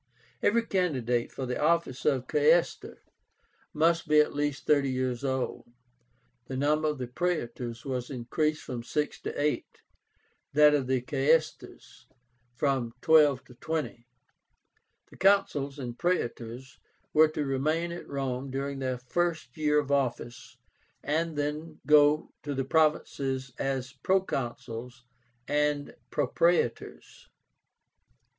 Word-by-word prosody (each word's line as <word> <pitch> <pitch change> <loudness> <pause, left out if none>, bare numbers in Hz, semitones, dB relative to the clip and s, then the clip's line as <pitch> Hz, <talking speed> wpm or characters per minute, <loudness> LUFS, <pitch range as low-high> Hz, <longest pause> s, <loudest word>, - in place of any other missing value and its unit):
Every 230 +2 +2
candidate 130 - 0
for 130 - -5
the 125 0 -3
office 165 -4 +1
of 135 -4 +2
Quaestor 155 +5 +1 0.7
must 165 +2 +2
be 150 0 +5
at 150 - +3
least 145 -1 -2
thirty 145 -2 +3
years 130 -1 -2
old. 130 -3 -3 0.8
The 130 - -4
number 150 +3 +2
of 130 -5 -3
Praetors 120 -9 -3
was 125 -3 -3
increased 150 +4 -1
from 125 -2 -5
six 150 +5 -2
to - - -5
eight; 150 +1 -2 0.7
that 150 +1 +6
of 140 -3 +1
Quaestors, 140 +4 -1 0.5
from 125 -3 0
twelve 150 -5 +5
to 125 - -16
twenty. 130 -3 -4 1.0
The - - -15
Consuls 170 -8 +2
and 125 -3 -6
Praetors 125 -7 -2 0.3
were 155 +1 +7
to 155 -1 -3
remain 155 +6 0
at 170 - -7
Rome 135 -1 -3
during 135 +1 -3
their 130 -1 -2
first 160 +1 -2
year 150 -1 +2
of 140 -1 -3
office, 120 -3 -2 0.5
and 160 +1 -1
then 150 +2 -3
go 150 0 +5
to 145 -1 -4
the 135 -1 -1
provinces 135 -4 0
as 135 -1 -2
Proconsuls 125 -7 -2 0.4
and 145 -1 0
Propraetors. 145 -1 0
140 Hz, 120 wpm, -28 LUFS, 130-155 Hz, 1.0 s, were